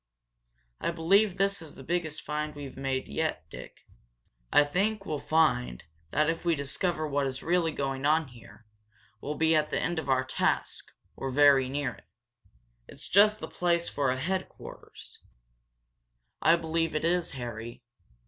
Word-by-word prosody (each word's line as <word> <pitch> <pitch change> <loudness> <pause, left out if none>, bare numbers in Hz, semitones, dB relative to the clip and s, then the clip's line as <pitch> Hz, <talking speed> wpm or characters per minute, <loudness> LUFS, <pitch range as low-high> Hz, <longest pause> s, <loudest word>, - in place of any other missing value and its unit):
"I - - -1
believe 185 +4 +3
this 195 0 +1
is 160 -3 -11
the 135 - -11
biggest 160 0 -2
find 150 0 -3
we've 140 -2 -8
made 135 -1 -2
yet, 70 - -2
Dick," - - -11
he - - -27 0.6
said. - - +10
"I - - +4
think 200 +6 0
we'll 150 -5 -3
find 140 - +1 0.3
that 150 - +2
if 165 0 -1
we 170 -1 +2
discover 155 +3 -2
what 140 -1 0
is 130 0 -5
really 170 -1 +2
going 135 -2 -3
on 155 0 +2
here, 115 -2 -16 0.6
we'll 150 +2 -4
be 160 +1 +3
at 150 -1 +2
the - - -1
end 175 +1 -1
of 155 - -6
our 130 -1 +3
task 130 - -1 0.3
or 135 - -4
very 135 -1 +5
near 135 -2 -2
it. - - -19 0.8
It's - - -8
just 210 +3 +5
the - - -6
place 170 -1 0
for 140 -2 0
a 130 - 0
headquarters." 185 +6 -6 1.2
"I 165 - +6
believe 165 -1 -1
it 155 - 0
is, 175 0 +1
Harry. 120 0 -7
155 Hz, 165 wpm, -29 LUFS, 135-170 Hz, 1.2 s, said